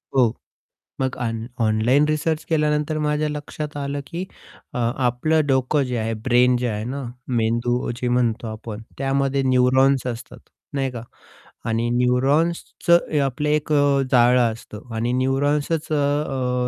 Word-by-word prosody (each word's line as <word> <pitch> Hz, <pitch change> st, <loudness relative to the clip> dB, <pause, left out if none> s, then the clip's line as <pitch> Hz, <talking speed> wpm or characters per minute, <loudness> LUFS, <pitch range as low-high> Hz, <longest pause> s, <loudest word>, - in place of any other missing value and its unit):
हो. 120 Hz, -4 st, +4 dB, 0.7 s
मग 130 Hz, -1 st, -1 dB
आन 115 Hz, -1 st, -2 dB
ऑनलाईन 115 Hz, +6 st, +3 dB
रिसर्च 155 Hz, +1 st, 0 dB
केल्यानंतर 150 Hz, -1 st, +1 dB
माझ्या 150 Hz, 0 st, 0 dB
लक्षात 150 Hz, 0 st, -6 dB
आलं 140 Hz, 0 st, -3 dB
की 170 Hz, +6 st, -5 dB, 0.5 s
अ, -, -, -2 dB
आपलं 125 Hz, +6 st, +1 dB
डोकं 135 Hz, +1 st, +2 dB
जे 125 Hz, -1 st, -3 dB
आहे 115 Hz, 0 st, -1 dB
ब्रेन 125 Hz, +1 st, +4 dB
जे 125 Hz, 0 st, -1 dB
आहे 105 Hz, -1 st, -3 dB
ना, 135 Hz, +4 st, -4 dB, 0.3 s
मेंदू 120 Hz, +1 st, 0 dB
जे 125 Hz, 0 st, -2 dB
म्हणतो 120 Hz, -1 st, +1 dB
आपण. 110 Hz, 0 st, -7 dB, 0.2 s
त्यामध्ये 135 Hz, 0 st, +1 dB
न्यूरॉन्स 130 Hz, +1 st, +3 dB
असतात, 120 Hz, -2 st, -6 dB, 0.4 s
नाही 135 Hz, -1 st, 0 dB
का. 120 Hz, -2 st, -7 dB, 0.7 s
आणि 115 Hz, +1 st, 0 dB
न्यूरॉन्सचं 140 Hz, +8 st, +2 dB
ए 150 Hz, -, +1 dB
आपलं 140 Hz, +2 st, -1 dB
एक 150 Hz, 0 st, 0 dB
अ, 145 Hz, -2 st, +3 dB
जाळं 120 Hz, -2 st, +4 dB
असतं 110 Hz, +1 st, -10 dB
आणि 115 Hz, +2 st, -1 dB
न्यूरॉन्सचं 140 Hz, -1 st, 0 dB
130 Hz, 135 wpm, -22 LUFS, 120-145 Hz, 0.7 s, हो